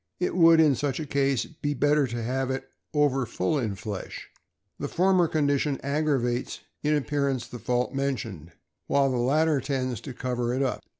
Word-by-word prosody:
It 180 - -1
would, 165 -2 +7
in 155 -3 +6
such 140 +1 -2
a 155 - -3
case, 140 -2 +1
be 145 -2 -4
better 145 +1 +3
to 120 -1 -4
have 130 +2 -1
it 130 0 -3 0.2
over 145 -3 +2
full 110 +12 0
in 110 -6 -2
flesh. 100 0 -7 0.5
The - - -2
former 185 -1 +3
condition 145 -2 +1
aggravates 140 -4 -1 0.2
in 150 0 +2
ap 145 - -1
pearance 140 -4 -1
the 120 - -8
fault 125 +2 -1
mentioned, 120 - -3 0.4
while 140 -1 +3
the 125 - 0
latter 145 +4 +2
tends 130 -4 -2
to 130 - -7
cover 125 -1 -2
it 135 - +1
up. 130 - -1
135 Hz, 180 wpm, -26 LUFS, 125-150 Hz, 0.5 s, would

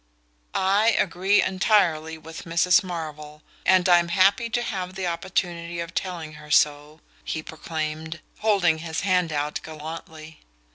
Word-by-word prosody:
"I 200 +4 +3
agree 190 +2 +2
entirely 175 -5 +2
with 160 +1 -10
Mrs. 175 +4 +3
Marvell 150 -4 -7 0.2
and 185 0 +5
I'm 175 -1 +5
happy 195 +7 +3
to 240 +1 -1
have 185 -5 -4
the 190 -1 -3
opportunity 170 -1 -2
of 170 0 -5
telling 170 -5 -4
her 150 - -13
so," 150 +1 +2 0.2
he 155 - -4
proclaimed, 160 0 -5 0.2
holding 190 -7 +2
his 160 0 -4
hand 180 -3 +1
out 150 0 -2
gallantly. 160 0 -9
170 Hz, 135 wpm, -24 LUFS, 155-185 Hz, 0.2 s, and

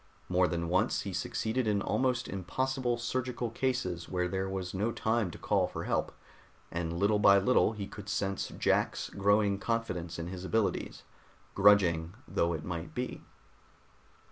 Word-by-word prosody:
More 90 0 +3
than 85 -1 -2
once 90 +2 +2
he - - -5
succeeded 115 +2 -1
in 105 -1 +2
almost 125 +4 0
impossible 120 +7 -1
surgical 120 0 -2
cases 115 -10 -2
where 90 -1 0
there 95 +1 -2
was 95 -2 -4
no 105 +5 0
time 110 -3 0
to - - -9
call - - +1
for - - -5
help, - - 0 0.6
and 85 -1 -2
little 105 +3 +3
by 100 -1 +7
little 110 +2 +3
he 105 -2 -5
could 100 0 -9
sense 100 -1 -1
Jack's - - 0
growing 100 0 +2
confidence 90 -8 -2
in 85 - -4
his 90 +1 -6
abilities, 110 +2 -1 0.5
grudging 95 -4 +4
though 85 0 +1
it 80 -1 -4
might 85 -2 -5
be. 125 +1 -3
100 Hz, 155 wpm, -31 LUFS, 90-115 Hz, 0.6 s, by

